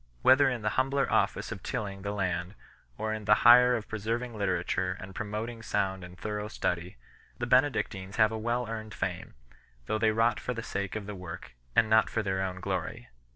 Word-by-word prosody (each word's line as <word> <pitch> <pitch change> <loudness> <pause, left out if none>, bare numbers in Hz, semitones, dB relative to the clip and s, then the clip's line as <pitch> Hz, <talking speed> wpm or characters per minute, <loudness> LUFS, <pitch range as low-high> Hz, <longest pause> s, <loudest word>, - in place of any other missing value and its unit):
Whether 135 +1 +6
in 120 -4 -3
the 105 - +2
humbler 135 +1 0
office - - +1
of - - -6
tilling 100 -2 -4
the 100 +1 -3
land, 90 -1 -2 0.4
or 110 0 -2
in 110 -1 -5
the 105 - +6
higher 125 +1 +8
of 110 -2 -4
preserving 115 +3 -3
literature 95 -1 -1
and 95 +1 -9
promot 105 +2 -3
ing 120 -1 -8
sound 95 -4 -1
and 90 0 -11
thorough 105 +2 -4
study, 90 - -3 0.4
the 120 - -2
Benedictines 120 -7 +1
have 110 -1 +4
a - - -3
well 120 +2 -1
earned 110 -1 -6
fame, 90 - -4 0.5
though 110 - -1
they 110 0 +4
wrought 115 +2 +2
for 125 - -3
the 115 - -4
sake 100 -2 -3
of 105 -2 -4
the 105 - -6
work, 90 -7 -8 0.2
and 115 - +5
not 110 0 +4
for 110 - -1
their 95 -1 -1
own 95 -1 -3
glory. 90 -9 -4
105 Hz, 200 wpm, -29 LUFS, 95-115 Hz, 0.5 s, higher